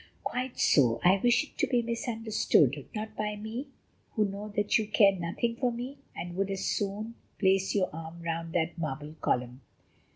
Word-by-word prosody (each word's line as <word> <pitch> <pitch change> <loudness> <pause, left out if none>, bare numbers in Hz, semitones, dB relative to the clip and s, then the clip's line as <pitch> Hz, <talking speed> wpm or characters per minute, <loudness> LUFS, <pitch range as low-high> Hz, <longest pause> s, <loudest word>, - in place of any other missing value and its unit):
"Quite 255 0 -3
so, 120 -5 +4
I 185 +2 +6
wish 240 +1 +4
it 295 - -16
to - - +3
be 245 -2 +2
misunderstood: 220 - +1
not 215 0 -4
by 210 0 -2
me, 220 +6 -5 0.5
who 215 -3 +2
know 200 +1 -5
that 205 +1 +3
you 215 - -2
care 205 -1 +6
nothing 185 +7 -2
for 250 -1 +1
me 250 +4 -6 0.2
and 175 0 -5
would 195 0 0
as 195 -1 -2
soon 210 +2 -2 0.2
place 190 0 +2
your 185 -5 +1
arm 165 +1 -7
round 165 0 -3
that 165 -1 0
marble 150 -1 -4
column." 125 +1 -1
200 Hz, 175 wpm, -30 LUFS, 165-230 Hz, 0.5 s, I